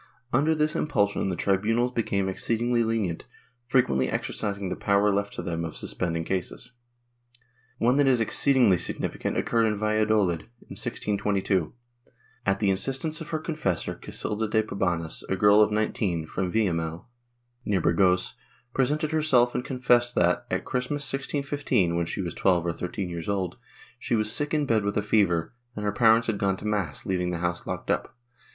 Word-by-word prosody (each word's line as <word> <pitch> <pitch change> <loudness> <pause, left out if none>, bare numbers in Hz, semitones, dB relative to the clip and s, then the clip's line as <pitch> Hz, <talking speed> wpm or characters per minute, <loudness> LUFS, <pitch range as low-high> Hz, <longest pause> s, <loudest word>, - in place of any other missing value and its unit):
Under 150 +6 +3
this 155 0 0
impulsion, 100 -8 +1
the 90 - -1
tribunals 110 +7 +1
became 100 -5 -1
exceedingly 115 +5 0
lenient, 110 -7 -1 0.4
frequently 65 - +2
exercising 100 -3 -2
the - - -2
power 100 0 +2
left 100 +1 -1
to - - -5
them 85 -2 -3
of 80 - -5
suspending 85 -2 -2
cases. 95 +7 -4 1.1
One 125 +3 +2
that 145 -1 +4
is 130 -2 +4
exceed 135 +5 +2
ingly 105 -9 +5
significant - - -3
occurred 115 -1 +2
at 105 - -3
Valladolid, 105 -5 +1 0.2
in - - -12
1622. 100 -4 -1 0.7
At 100 - +3
the 100 -2 +2
instance 135 - -1
of 165 - -7
her 160 - -1
confessor, 155 - -2
Casilda 110 +1 -3
de 110 +1 +2
Pabanes, 90 -6 -2
a 95 - +1
girl 105 +2 +5
of 105 - +4
19, 105 -6 -1
from 90 +3 -3
A^illamiel, 85 -6 -1 0.6
near 100 -5 +1
Burgos, 90 +2 +2 0.4
presented 150 +4 0
herself 135 -6 +3
and - - -2
confessed 125 -2 +2
that, 90 0 +2
at - - -2
Christmas 125 +3 -2
1615 135 - 0
(when 85 -1 0
she - - -3
was 85 - -4
12 90 -3 +2
or 85 - 0
13 90 +3 -4
years 85 +1 -5
old) 95 -3 -2 0.4
she - - -1
was 110 -1 +1
sick 150 0 0
in 150 -2 +1
bed 110 -5 +2
with 100 0 -1
a 105 - +1
fever, 100 -4 +1 0.2
and 105 - -4
her 105 - +1
parents 115 +2 +4
had 110 -3 -1
gone 95 -1 +1
to - - -10
mass, 100 -9 -2
leaving 90 -1 -1
the 90 - -2
house 85 +1 -3
locked - - -3
up. - - -2
105 Hz, 170 wpm, -26 LUFS, 90-120 Hz, 1.1 s, ingly